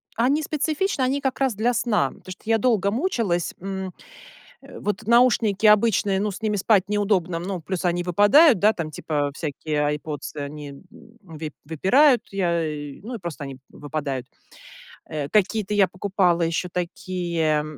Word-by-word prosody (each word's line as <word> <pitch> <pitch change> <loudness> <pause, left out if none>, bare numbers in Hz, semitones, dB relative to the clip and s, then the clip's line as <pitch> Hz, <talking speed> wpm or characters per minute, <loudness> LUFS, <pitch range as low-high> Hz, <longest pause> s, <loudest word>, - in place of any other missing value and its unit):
они 270 +7 +2
специфичны, 310 +3 -1
они 260 +2 +1
как 265 -2 -2
раз 265 -5 +1
для 230 +4 +1
сна, 210 - +1
потому 185 - -13
что 185 - -11
я 225 0 +2
долго 205 -4 +2
мучилась, 230 - -1
м, 190 0 -5 0.7
э. - - -12
Вот 210 +1 -3
наушники 235 -4 +3
обычные, 210 -2 +4
ну, 210 +1 0
с 200 - -9
ними 215 -1 0
спать 200 -1 +2
неудобно, 200 -5 0
ну, 180 0 -5
плюс 185 +2 -4
они 175 0 0
выпадают, 205 - +5
да, 210 +4 +4
там, 160 -3 -4
типа, 145 -2 -2
всякие 150 0 -3
"Айрподсы", 150 0 -4
они, 145 0 -6
м, 140 - -13 0.4
выпь 160 -4 -8
выпирают, 230 - +4
я 170 -4 0
и 145 -2 -6 0.2
просто 170 -4 -5
они 135 -1 -7
выпадают, 145 -3 -4 0.8
э. 145 -2 -4
Какие-то 210 0 +1
я 200 -2 +5
покупала 185 -2 +1
еще 165 +2 0
такие, 170 -3 -1
190 Hz, 155 wpm, -23 LUFS, 160-220 Hz, 0.8 s, выпадают